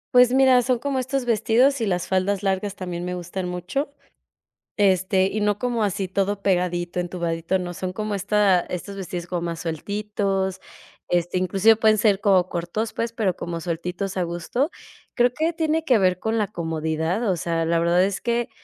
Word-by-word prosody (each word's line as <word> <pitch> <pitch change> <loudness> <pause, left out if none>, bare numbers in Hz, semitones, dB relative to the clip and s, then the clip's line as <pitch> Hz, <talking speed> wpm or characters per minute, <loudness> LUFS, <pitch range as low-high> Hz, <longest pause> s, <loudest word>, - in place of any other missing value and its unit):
Pues 250 0 +7
mira, 260 -1 +6
son 250 0 0
como 270 +1 -1
estos 260 +1 -1
vestidos 245 +4 +3
y 225 - 0
las 180 -3 -1
faldas 190 +1 0
largas 195 +1 -1
también 180 -2 -5
me 180 - -3
gustan 180 +1 -5
mucho. 180 - -3 0.8
Este, 190 -1 +3
y 210 +2 -2
no 205 0 +1
como 240 -3 0
así 195 -1 -1
todo 200 +2 -1
pegadito, 180 -2 0
entubadito, 170 0 -2
no. 175 -1 -5
Son 185 +1 -4
como 210 +1 -3
esta 200 -2 +3
estos 185 +3 -6
vestidos 175 -2 -5
como 175 -1 -2
más 170 -1 -4
sueltitos, 195 +2 -2 0.5
este, 175 +1 0
inclusive 195 +4 +4
pueden 220 0 +3
ser 205 -3 +3
como 190 -4 +4
cortos, 175 +6 -3
pues, 230 0 -2
pero 210 -6 0
como 170 -1 -5
sueltitos 180 +3 -4
a 185 - 0
gusto. 175 - -2 0.4
Creo 245 0 +3
que 320 +2 +1
tiene 320 0 0
que 260 -7 +4
ver 185 -2 +2
con 225 +1 -1
la 210 - +1
comodidad, 160 +3 -2
o 185 - +2
sea, 165 -1 -1
la 165 +1 +2
verdad 170 +2 +3
es 195 -1 -3
que 235 0 -1
190 Hz, 185 wpm, -23 LUFS, 175-220 Hz, 0.8 s, Pues